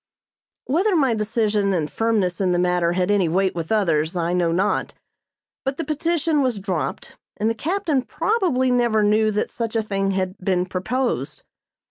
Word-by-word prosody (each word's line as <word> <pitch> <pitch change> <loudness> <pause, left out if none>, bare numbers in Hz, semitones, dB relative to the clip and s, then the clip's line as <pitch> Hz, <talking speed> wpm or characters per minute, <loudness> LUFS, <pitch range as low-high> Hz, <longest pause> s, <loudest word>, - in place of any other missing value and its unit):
Whether 365 +8 +1
my 270 -7 +3
decision 210 -2 0
and 160 -5 0
firmness 205 -3 0
in 185 -2 +2
the - - +1
matter 180 -1 +1
had 180 +2 +1
any 195 -5 +2
weight 190 +3 +1
with 165 +1 -5
others, 165 -6 +1
I 170 0 0
know 175 -2 +1
not; 190 +5 0 0.7
but 270 0 -2
the 330 - -2
petition 315 0 0
was 255 -5 0
dropped, 190 -5 -4 0.2
and 220 +2 +1
the - - 0
captain 315 - -1
probably 325 - 0
never 235 -3 +2
knew 215 +1 +3
that 210 0 -1
such 230 -1 -4
a 225 - +1
thing 195 -2 -1
had 190 -1 -2
been 180 -1 0
proposed. 245 - -2
210 Hz, 170 wpm, -22 LUFS, 185-260 Hz, 0.7 s, my